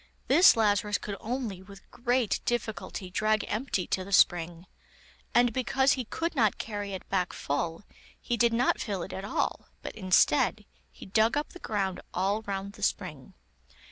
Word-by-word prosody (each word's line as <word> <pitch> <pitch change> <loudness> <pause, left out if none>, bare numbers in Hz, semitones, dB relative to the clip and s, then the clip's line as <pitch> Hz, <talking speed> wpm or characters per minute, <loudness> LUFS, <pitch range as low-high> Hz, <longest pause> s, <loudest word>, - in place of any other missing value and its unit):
This 350 -8 +7
Lazarus 210 -1 +2
could 205 - -6
only, 225 -5 -4
with 195 +1 -15
great 245 -2 0
difficulty, 220 -5 -3
drag 215 +2 +1
empty 215 -5 -1
to 185 - -1
the 200 - -10
spring, 175 -2 +3 0.7
and 240 -1 +4
because 265 +2 +2
he 255 -2 0
could 335 +9 -3
not 220 -6 +2
carry 205 -2 -5
it 190 - -7
back 185 -2 0
full, 165 +6 -3 0.4
he 240 - -2
did 235 0 +3
not 240 +3 +2
fill 195 -6 -3
it - - -8
at 190 - -5
all, 200 - -2 0.2
but, - - -5
instead, 190 +1 +2 0.3
he - - -12
dug 220 +7 +2
up 295 - -2
the 360 - -12
ground 195 - -2
all 195 +4 +1
round 200 -1 -5
the 210 - -14
spring. 165 -9 -3
205 Hz, 170 wpm, -28 LUFS, 190-235 Hz, 0.7 s, This